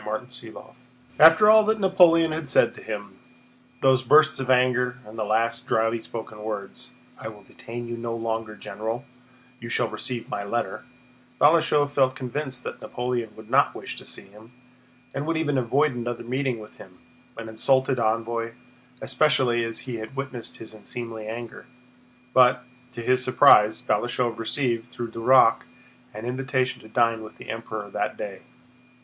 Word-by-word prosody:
CHAPTER 120 +2 -5
VII - - -10 0.6
After 165 +6 +8
all 220 0 +8
that 220 0 +1
Napoleon 175 -4 +5
had 155 -2 -4
said - - +3
to - - -13
him—those 125 +4 -3
bursts 150 +3 +5
of 130 -1 -4
anger 125 -1 +2
and 105 +1 -12
the 110 - -2
last 115 +4 0
dryly 115 +1 +1
spoken 110 -2 -8
words: 105 +3 -6 0.3
"I - - -6
will 105 -2 -10
detain 120 +1 -8
you 120 - -4
no 115 0 -4
longer, 115 -1 -3
General; 110 +6 -5 0.5
you 115 -1 -8
shall 120 -1 +1
receive 120 +2 -3
my 100 -1 -4
letter," 100 -1 -3 0.5
Balashëv 150 -2 +4
felt 130 -2 +2
convinced 130 0 -5
that - - -7
Napoleon 120 -3 -3
would 110 0 -13
not - - +3
wish - - -7
to - - -9
see - - -7
him, 110 +4 -17 0.6
and 140 +2 -4
would 165 0 0
even 150 -3 0
avoid 135 +4 +1
another 120 0 -4
meeting 130 +1 -2
with 105 0 -13
him—an 115 0 -14
insulted 130 +3 +1
envoy—especially 120 +3 -1
as 115 0 -4
he 125 -3 -5
had 110 +4 -8
witnessed 135 -3 -6
his 110 -1 -10
unseemly 110 0 -7
anger. 115 +2 -7 0.7
But, 125 0 +5 0.3
to 120 - -6
his 130 +2 +2
surprise, 110 -3 +5
Balashëv 120 -1 -1
received, 115 0 -1
through 120 -2 -6
Duroc, 125 +3 +4 0.5
an 110 +2 -8
invitation 130 +1 -1
to - - -14
dine 115 0 +2
with 110 0 -11
the - - -7
Emperor 110 -2 -6
that 105 - -2
day. 100 -2 -6
120 Hz, 155 wpm, -25 LUFS, 115-130 Hz, 0.7 s, After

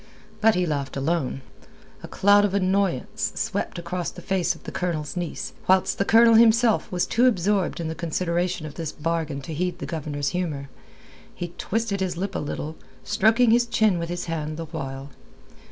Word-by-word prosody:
But 225 0 +5
he 180 0 +1
laughed 140 -4 -3
alone. 135 -2 -1 0.6
A - - -8
cloud 205 +1 +4
of 200 -1 +1
annoyance 190 -6 0
swept - - -2
across 175 +1 -3
the - - -11
face 180 -2 0
of - - -16
the - - -7
Colonel's 165 -4 -3
niece, 175 -2 -4 0.2
whilst 190 0 +3
the 195 - +2
Colonel 230 +1 +6
himself 230 0 +4
was 180 -1 +1
too 245 +3 +3
absorbed 195 -5 +1
in 165 - -3
the 160 - -3
consideration 170 +1 -1
of 150 - -7
this 160 -2 -4
bargain 155 -2 -2
to 160 +4 -7
heed 180 +3 -2
the - - -6
Governor's 145 -4 -3
humour. 150 -6 -3 0.7
He 175 - -4
twisted 225 -2 -2
his 180 -2 -2
lip 195 +2 -3
a - - -2
little, 150 +1 -5 0.3
stroking 225 +2 +3
his 240 +1 +4
chin 215 -6 +2
with 170 0 -4
his 175 0 -3
hand 155 -2 -3
the 165 - -4
while. 140 -3 -6
175 Hz, 185 wpm, -24 LUFS, 155-200 Hz, 0.7 s, Colonel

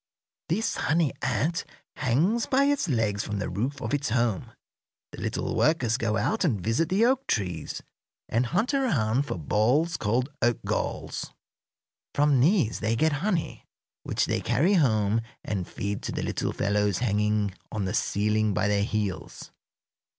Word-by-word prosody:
This 210 +8 0
honey 160 -1 +2
ant 145 +7 0 0.3
hangs 170 - +1
by 270 +1 +3
its 285 -7 +1
legs 110 -5 +1
from 105 -1 -3
the 100 - -3
roof 125 +10 -2
of - - -3
its 145 -2 0
home. 115 -5 0 0.6
The - - -9
little - - -2
workers 125 -7 +2
go 115 -4 0
out 215 - 0
and 130 - +1
visit 115 - 0
the 200 +5 +3
oak 265 +2 +1
trees 90 -7 -2 0.4
and 120 +2 +1
hunt 215 - 0
around 145 - +1
for - - -3
balls 120 - +1
called 120 +5 0
oak 120 -1 +3
galls. - - -3 0.9
From 145 -2 +4
these 150 - +3
they 110 +1 0
get 155 +6 +2
honey, 190 -4 -2 0.3
which - - 0
they - - -1
carry 170 +9 +2
home 110 - +3 0.2
and 95 -4 -3
feed 100 0 -4
to - - -4
the - - -3
little - - -1
fellows 105 -2 +1
hanging 105 -3 +1 0.2
on 105 -3 -2
the 95 - -2
ceiling 105 0 +1
by 100 - +1
their 100 -1 +2
heels. 105 -3 -3
120 Hz, 160 wpm, -27 LUFS, 105-160 Hz, 0.9 s, From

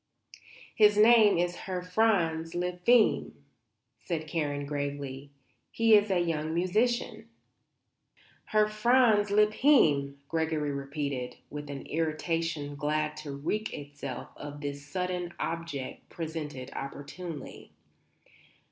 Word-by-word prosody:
"His 210 -1 +5
name 215 -2 +7
is 175 0 0
Herr 180 -1 -3
Franz 180 -5 +1
Lippheim," 180 +6 +2 0.7
said 160 +1 -3
Karen, 145 -3 -2
gravely. 140 -1 -4 0.4
"He 225 -1 +3
is 210 0 +6
a 185 -2 +2
young 160 -2 -1
musician." 220 +4 0 1.2
"Herr 215 0 +3
Franz 215 -1 +3
Lippheim," 205 - +4
Gregory 160 -2 -1
repeated, 140 -3 -4 0.2
with 145 0 -6
an 140 -1 -6
irritation 160 -2 -2
glad 150 +1 -1
to 150 -2 -6
wreak 170 +11 -3
itself 145 -3 -7
on 145 0 -8
this 140 0 -5
sudden 180 +1 -3
object 165 -5 -5
presented 155 -5 -6
opportunely. 145 +3 -7
165 Hz, 105 wpm, -29 LUFS, 145-205 Hz, 1.2 s, name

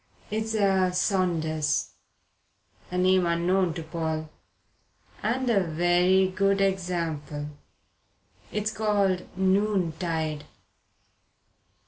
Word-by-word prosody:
It's 220 +1 -2
a 190 -3 +3
Saunders" 170 -5 0 1.0
a 180 - -3
name 185 -1 +3
unknown 170 +1 +1
to 165 - -5
Paul 160 -1 -3 0.9
"and 250 +4 -1
a 205 -5 +3
very 175 +3 +3
good 195 +1 +1
example. 165 -6 -2 1.0
It's 210 0 -1
called 200 -4 0
Noontide. 175 -6 0
180 Hz, 80 wpm, -26 LUFS, 165-195 Hz, 1.0 s, a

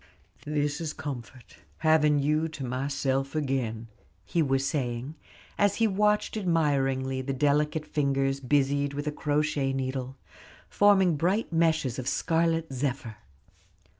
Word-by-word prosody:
"This 150 +1 -1
is 155 -2 -3
comfort, 125 -3 -8 0.2
having 155 -2 +3
you 150 +3 +1
to 155 -4 -6
myself 135 +2 -1
again," 130 -6 -2 0.4
he 165 +11 0
was 135 -2 +1
saying, 130 -1 -2 0.5
as 205 -1 +3
he 230 - +2
watched 210 +1 +1
admiringly 135 -8 0
the 135 +1 -3
delicate 150 +3 +1
fingers 135 -2 0
busied 140 +1 +1
with 145 +1 -3
a 150 - -1
crochet 150 -2 0
needle, 130 0 -3 0.5
forming 195 -5 +4
bright 185 +5 0
meshes 160 -6 +1
of 130 - -5
scarlet 165 0 0
zephyr. 125 -4 -3
145 Hz, 125 wpm, -27 LUFS, 135-160 Hz, 0.5 s, forming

